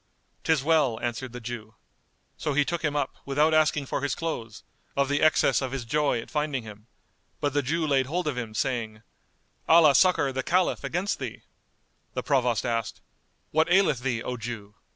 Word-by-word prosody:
"'Tis 160 -4 +2
well," 150 -7 +2
answered 120 +1 -3
the 125 - -7
Jew. 115 -2 -7 0.6
So 150 - -2
he 145 0 +3
took 170 +1 -3
him 150 -1 0
up, 145 -2 -2
without 150 +3 +2
asking 155 -2 +3
for 135 - -3
his 140 - -1
clothes, 115 -10 -5 0.3
of 140 -1 +2
the 145 0 +1
excess 145 -5 +4
of 130 -2 -3
his 135 -3 -4
joy 145 0 +1
at 115 - -9
finding 150 -5 -1
him; 105 0 -12 0.5
but 145 -2 -1
the 145 - +2
Jew 160 +5 -1
laid 135 -3 +2
hold 175 +5 -2
of 150 -3 -1
him, 115 -3 -5
saying, 115 -3 -2 0.7
"Allah 160 -3 +7
succour 180 -5 +4
the 130 0 -2
Caliph 180 +6 +1
against 180 +4 -2
thee!"[FN#201] 125 -5 -6 0.7
The - - -2
Provost 125 -6 +1
asked, 115 -2 -2 0.5
"What 160 +3 +2
aileth 185 -8 +4
thee, 125 -3 -2
O 125 - -4
Jew?" 110 -3 -7
135 Hz, 185 wpm, -26 LUFS, 120-155 Hz, 0.7 s, Allah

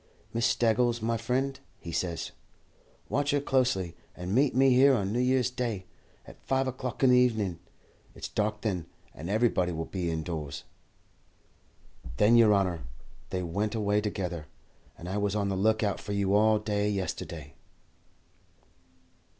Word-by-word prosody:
'Miss 115 0 +2
Staggles, 120 +1 +2
my 115 +1 0
friend,' 130 +4 -1 0.2
he 85 - -7
says, 85 0 -2 0.8
'watch 145 +1 0
her 145 - +3
closely, 125 -11 0 0.2
and 90 +2 -4
meet 135 +3 +3
me 135 0 +5
here 135 +2 +6
on 100 -3 -1
New 120 - 0
Year's 125 0 +2
Day, 120 -7 -3 0.4
at - - -14
five 135 0 0
o'clock 130 -1 -4
in 130 - +6
the 125 - +6
evening. 110 -9 +1 0.6
It's - - -6
dark 105 0 -1
then, 90 -7 -2 0.3
and 80 +5 -7
everybody 105 -4 +2
will 80 -1 -3
be 90 -3 -3
indoors.'" 80 -3 -4 1.5
"Then, 105 +3 +5
yer 115 -2 +7
honour, 95 -5 +1 0.5
they 90 -1 -2
went 100 +6 -2
away 105 -1 +1
together, 90 -6 -3 0.5
and 85 - -9
I 95 +3 -2
was 100 0 0
on 100 -1 0
the 95 - -1
look 110 +3 +2
out 100 -2 0
for 105 - -5
you 100 -1 +1
all 110 +1 +5
day 105 -1 -1
yesterday." 85 -7 -4
105 Hz, 155 wpm, -29 LUFS, 90-120 Hz, 1.5 s, yer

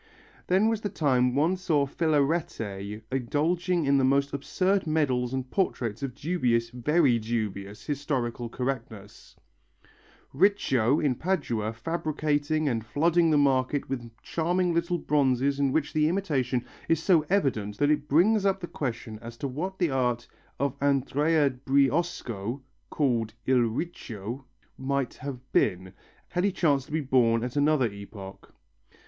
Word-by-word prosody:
Then 190 +4 +3
was 225 -1 0
the 205 - -2
time 130 -8 +1
one 160 +6 +2
saw 160 -6 +1
Filarete 135 - -1
indulging 165 +7 0
in 140 0 +4
most 140 +1 +2
absurd 185 +6 0
medals 130 -6 +1
and 130 -1 -3
portraits 120 - -1
of 135 -3 -4
dubious, 125 -9 0
very 130 0 +2
dubious, 105 -2 -4
historical 130 -5 -2
correctness; 115 -5 -6 1.0
Riccio 140 - +3
in 145 -4 +2
Padua 125 - -1
fabricating 155 +2 -1
and 115 -5 0
flooding 165 +9 +2
the 155 - +4
market 140 0 +2
with 120 -3 -4
charming 175 +2 0
little 170 +1 0
bronzes 140 -3 +1
in 140 -2 +2
which 150 +1 0
the 155 -1 +3
imitation 135 -10 -1 0.2
is 165 -2 +3
so 170 -5 +4
evident 110 - 0
that 145 +1 +3
it 150 -1 0
brings 195 +8 +4
up 195 -1 +2
the 180 - -5
question 120 -8 -5
as 115 0 -9
to 140 - -3
what 175 +9 -4
the 175 -5 +1
art 125 -2 0 0.3
of 140 -2 0
Andrea 145 +2 +2
Briesco 135 - 0 0.3
(called 115 -6 0
il 130 -1 +4
Riccio) 120 - -4 0.3
might 135 -1 -1
have 140 -1 -6
been, 95 -2 +1 0.4
had 180 0 -1
he 200 - +2
chanced 145 -7 +1
to - - -14
be 155 +1 0
born 120 -4 +2
at 125 +1 -4
another 145 -2 +3
epoch. 100 -1 -10
140 Hz, 140 wpm, -27 LUFS, 120-160 Hz, 1.0 s, in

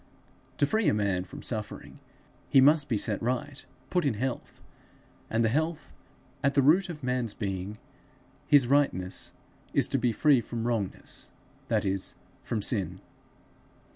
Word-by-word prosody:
To - - +3
free 220 +8 +1
a - - +3
man 100 -3 0
from - - -10
suffering, 110 -3 -3 0.5
he 135 - +6
must 145 +2 +5
be 115 - +1
set 105 0 -1
right, 130 +4 -2 0.3
put 180 -1 +2
in 140 -6 +1
health; 130 +3 -4 0.7
and 115 +1 +1
the - - +3
health 155 +4 -2 0.5
at 140 -1 +2
the 140 - +4
root 175 +7 +4
of 150 -4 -7
man's 125 -4 -1
being, 95 0 -4 0.7
his 145 -3 +6
rightness, 120 -9 +1 0.4
is - - +4
to - - +1
be 120 - +2
free 135 +3 +4
from 115 0 -5
wrongness, 115 -5 -2 0.4
that - - +1
is, 95 -1 -1 0.3
from 110 -3 -3
sin. 100 -5 +1
120 Hz, 150 wpm, -28 LUFS, 105-145 Hz, 0.7 s, he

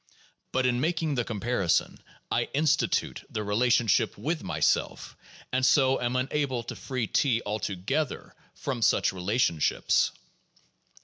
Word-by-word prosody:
But 130 0 +1
in 125 0 +1
making 160 -1 0
the 125 -3 0
com 110 -3 -5
parison, 105 -6 0 0.3
I - - +1
institute 150 0 +1
the 110 - -3
relationship 115 +1 +2
with - - -2
myself, - - -1 0.4
and 130 0 +1
so 130 0 +4
am 120 +1 -1
unable 130 -1 -1
to 120 - -7
free 130 -4 -3
T 120 +1 +1
altogether 105 - -3 0.2
from 130 -4 -4
such 110 - +3
relationships. 90 - +1
125 Hz, 125 wpm, -27 LUFS, 110-135 Hz, 0.4 s, so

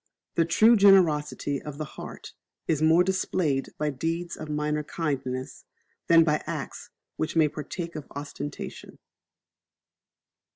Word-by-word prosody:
The 165 - +2
true 220 +8 +5
generosity 155 - +4
of 150 -2 -8
the 155 - -3
heart - - -10 0.3
is 155 -2 +1
more 160 +3 +5
displayed 180 -7 0
by 150 -1 0
deeds 165 +5 -3
of 155 - -8
minor 150 0 -1
kindness, 135 -5 -4 0.4
than 165 -1 +7
by 150 -1 +1
acts - - -5 0.3
which 155 - -2
may 160 -2 +5
partake 165 +3 -6
of 155 - -6
ostentation. 145 0 -7
155 Hz, 125 wpm, -27 LUFS, 150-170 Hz, 0.4 s, than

